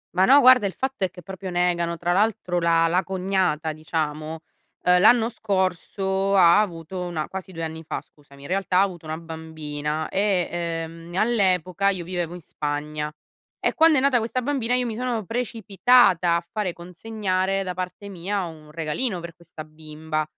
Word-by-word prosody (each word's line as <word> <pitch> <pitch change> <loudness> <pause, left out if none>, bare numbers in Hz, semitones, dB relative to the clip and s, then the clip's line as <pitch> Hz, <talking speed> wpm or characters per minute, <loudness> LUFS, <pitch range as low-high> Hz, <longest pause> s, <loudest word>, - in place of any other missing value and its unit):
Ma 185 - +5
no, 280 +6 +7
guarda 255 -5 +7
il 190 - -5
fatto 265 -6 -2
è - - -3
che 180 - -13
proprio 190 +1 -7
negano, 175 -1 0
tra 175 +1 0
l'altro 185 -3 +1
la 165 -1 +3
la 175 +3 +2
cognata, 185 -5 0
diciamo, 155 0 -3 0.4
uhm, 180 0 +5
l'anno 225 +3 +6
scorso 190 -1 -1
ha 175 +1 +7
avuto 180 -1 -4
una 170 -4 -3
quasi 190 0 -7
2 165 -2 -6
anni 160 0 -5
fa, - - -4
scusami, 140 -2 -19
in - - -8
realtà 185 0 0
ha - - +7
avuto 175 -5 -5
una 155 0 -3
bambina 160 -2 -5
e, 195 -3 +1
ehm, 165 0 -5
all'epoca 195 -4 +2
io 185 -3 -2
vivevo 175 -1 -3
in 180 - -10
Spagna; 150 0 -4 0.5
e - - 0
quando 320 -1 +5
è - - +3
nata 270 -2 +3
questa 235 +3 -2
bambina 250 -3 0
io 250 0 0
mi 225 -2 -3
sono 240 -3 -2
precipitata 225 -5 +3
a 170 0 -2
fare 205 -5 -2
consegnare 190 +1 -2
da 180 -1 -4
parte 185 +2 -6
mia 195 +1 -3
un 155 -3 -9
regalino 165 +7 -2
per 170 -1 -8
questa 170 -2 -11
bimba, 155 0 -5
180 Hz, 175 wpm, -24 LUFS, 165-200 Hz, 0.5 s, no